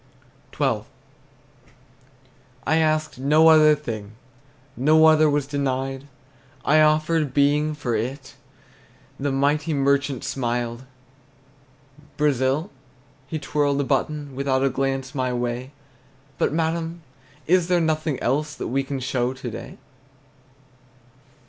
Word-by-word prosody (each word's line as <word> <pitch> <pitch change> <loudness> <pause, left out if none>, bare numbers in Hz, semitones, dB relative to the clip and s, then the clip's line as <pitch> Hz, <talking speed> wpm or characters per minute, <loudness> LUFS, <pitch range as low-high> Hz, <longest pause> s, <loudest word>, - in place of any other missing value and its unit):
XII. - - +1 1.8
I 160 - +2
asked 155 -3 0
no 155 +4 +5
other 155 -1 +6
thing, 110 -6 -7 0.6
No 155 +5 +4
other 155 -1 +5
was 145 -1 0
denied. 135 -1 -3 0.6
I 155 +2 +5
offered 155 -2 +2
Being 150 +2 +2
for 125 -6 -2
it; 130 +5 -4 0.9
The 140 +1 -1
mighty 145 +3 +1
merchant 140 -1 +1
smiled. 120 -1 -3 1.3
Brazil? 145 - +1 0.6
He 160 - -4
twirled 145 -2 0
a - - +1
button, 145 +1 -2
Without 135 -1 0
a 135 - +3
glance 135 0 -2
my 130 -2 -1
way: 120 +1 -3 0.7
"But, - - +1
madam, 165 +1 -2 0.4
is 180 0 +3
there 180 -1 +2
nothing 155 -3 -1
else 150 +4 -1
That - - -5
we 135 +2 +1
can 135 0 -4
show 125 -1 -1
to 130 -2 -7
day?" - - -9
140 Hz, 115 wpm, -23 LUFS, 130-155 Hz, 1.8 s, other